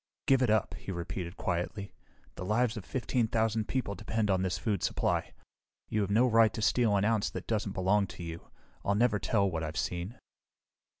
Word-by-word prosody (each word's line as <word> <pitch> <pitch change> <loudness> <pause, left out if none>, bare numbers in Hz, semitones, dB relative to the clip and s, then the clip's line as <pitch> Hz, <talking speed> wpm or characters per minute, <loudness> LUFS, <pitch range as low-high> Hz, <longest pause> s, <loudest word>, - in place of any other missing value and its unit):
"Give 135 -1 +4
it 125 - +3
up," 110 -1 +2
he - - -7
repeated 85 0 -5
quietly. 90 +3 -3 0.4
"The - - -7
lives 110 +4 +1
of 105 - -7
fifteen 125 -2 0
thousand 110 -1 0
people 130 -6 -1
depend 105 +2 -1
on 95 -1 +2
this 95 -1 0
food 100 -6 -1
supply. - - 0 0.6
You 105 - +1
have 100 - -1
no 110 +5 +4
right 115 -2 +5
to 110 - -3
steal 110 -1 +3
an 100 0 +2
ounce 110 -2 +2
that - - -6
doesn't 105 -3 -1
belong 100 +2 +2
to 90 - -9
you. 85 0 -7 0.3
I'll 100 - +1
never 110 -1 +3
tell 100 -2 +2
what 80 -1 -2
I've 80 0 -4
seen." 90 +7 -3
105 Hz, 195 wpm, -31 LUFS, 95-115 Hz, 0.6 s, right